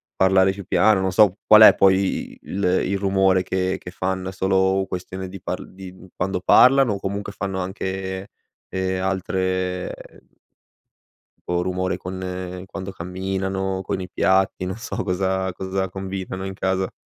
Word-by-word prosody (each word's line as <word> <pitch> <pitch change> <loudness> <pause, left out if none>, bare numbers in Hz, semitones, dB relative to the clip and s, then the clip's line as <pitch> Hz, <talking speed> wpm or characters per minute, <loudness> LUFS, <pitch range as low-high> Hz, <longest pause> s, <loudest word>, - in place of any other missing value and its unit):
parlare 95 0 +4
più 100 0 -8
piano, 105 +1 +3
non 95 0 0
so, 95 0 +5
qual 110 0 +8
è - - +9
poi 95 0 +2
il 100 +1 -4
il 95 +2 +1
rumore 95 -1 +2
che 95 0 -1
che 90 - -9
fanno? 95 0 -3
È - - -6
solo 95 0 +1
questione 95 +1 -6
di 95 0 -10
parl - - -6
di, 95 -1 -9
mhmm, 95 0 -15
quando 90 +1 -1
parlano? 125 +1 +6
O 100 - -4
comunque 100 +1 -4
fanno 95 -1 -3
anche, 95 0 -4 0.4
ehm, 95 0 -2
altre 95 -1 -1 1.6
o 90 0 +1
rumore 90 0 -1
con 90 0 -6
quando 95 0 -7
camminano? 95 +1 -3
Con 95 - -3
i 90 - -6
piatti? 95 +1 +1
Non 95 +2 -4
so, 115 - -4
cosa 95 0 -1
cosa 95 +1 -3
combinano, 95 0 -5
in 95 - -5
casa? 95 0 -1
95 Hz, 155 wpm, -22 LUFS, -, 1.6 s, è